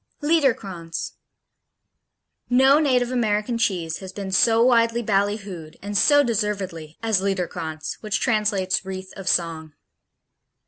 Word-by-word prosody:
Liederkranz 205 - 0 1.4
No 265 +4 +5
native 250 -5 +1
American 230 -1 0
cheese 180 -8 -1
has 190 -1 -8
been 195 0 -6
so 225 +4 +4
widely 235 -1 +3
ballyhooed, 200 -5 -2
and 205 +1 -6
so 290 +8 +5
deservedly, 200 - -3
as 220 -4 +1
Liederkranz, 175 -5 -3
which 215 -1 -1
translates 210 -6 0
"Wreath 190 0 -7
of 195 -2 -4
Song." 160 -3 -1
205 Hz, 110 wpm, -23 LUFS, 185-230 Hz, 1.4 s, No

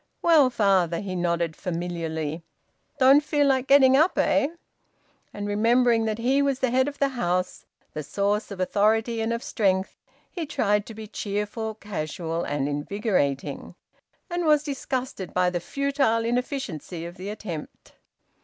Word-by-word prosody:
"Well, 315 -6 +6
father," 190 -7 +2
he 190 -2 -5
nodded 170 -2 -1
familiarly. 165 -3 -4 0.6
"Don't 275 +2 +6
feel 295 -1 +1
like 265 -1 +2
getting 265 -1 +6
up, 315 +6 +3
eh?" 285 -1 +3 0.8
And, 205 0 -5
remembering 230 +2 +3
that 215 -1 -1
he 260 +4 +2
was 280 -2 +1
the 260 -2 0
head 260 +2 +3
of 290 0 -5
the 280 - +2
house, 185 -8 -2 0.3
the 155 - -4
source 200 +7 -1
of 200 -3 -8
authority 220 +4 +1
and 225 +1 -1
of 235 +1 -2
strength, 190 -3 0 0.4
he 335 -5 -4
tried 210 -7 +1
to 225 - -9
be 220 0 -7
cheerful, 210 +1 -4
casual, 170 -4 -4
and 145 -1 -1
invigorating, 145 - -2 0.5
and 350 -1 -2
was 300 -1 +4
disgusted 260 - -4
by 180 0 +3
the 175 - -1
futile 275 - 0
inefficiency 235 - -3
of 170 +1 -8
the 190 +2 -6
attempt. 195 -7 -8
215 Hz, 150 wpm, -25 LUFS, 180-260 Hz, 0.8 s, Well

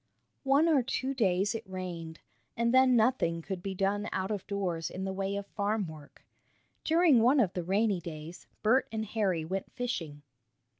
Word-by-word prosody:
One 280 +4 +4
or 305 -5 +4
two 260 +1 -2
days 195 -5 +1
it 225 -4 -6
rained, 175 -4 -6 0.4
and 235 +1 +1
then 260 -1 +6
nothing 220 -8 +2
could 190 -1 -5
be 195 +1 -4
done 200 +2 0
out 190 +2 -2
of 205 -3 -4
doors 185 -5 -2
in 190 - -6
the 190 - -3
way 195 +1 -2
of 200 0 -4
farm 205 +1 -1
work. 155 -3 -13 0.6
During 320 -6 +4
one 255 +5 +5
of 195 -7 +2
the 180 - -3
rainy 200 +2 +1
days 160 0 -9 0.2
Bert 240 +5 +3
and 220 -1 -2
Harry 195 -7 -1
went 190 +3 -4
fishing. 165 -13 -4
200 Hz, 180 wpm, -30 LUFS, 180-235 Hz, 0.6 s, then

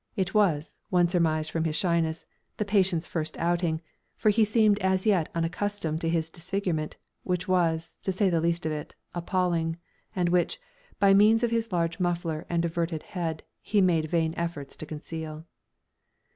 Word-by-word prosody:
It 190 -1 -1
was, 170 -8 +2
one 175 -1 +4
surmised 160 -3 +1
from 165 - 0
his 160 -2 -1
shyness, 165 -2 0 0.3
the 210 - -1
patient's 190 -4 +2
first 160 -3 -3
outing, 170 -1 0 0.4
for 215 - +4
he 220 +2 +4
seemed 215 -1 +3
as 190 0 +1
yet 190 -7 +3
unaccustomed 165 -1 -1
to 165 - 0
his 165 -1 0
disfigurement, 175 -3 -2 0.2
which 180 -1 -2
was, 170 -3 +1
to 190 - -1
say 195 +2 +2
the 170 -3 +2
least 170 0 0
of 155 - 0
it, 150 -1 -5 0.2
appalling, 170 -2 0 0.4
and 180 -2 +1
which, 180 - +1 0.4
by 200 -1 +6
means 215 +4 +5
of 235 - +2
his 230 -1 0
large 170 0 0
muffler 170 -3 -1
and 170 0 +1
averted 165 -1 -2
head, 165 -4 -4 0.2
he 210 - +1
made 165 -5 +3
vain 160 -1 +1
efforts 165 -5 -4
to 155 - -7
conceal. 155 0 -6
170 Hz, 170 wpm, -27 LUFS, 160-190 Hz, 0.4 s, by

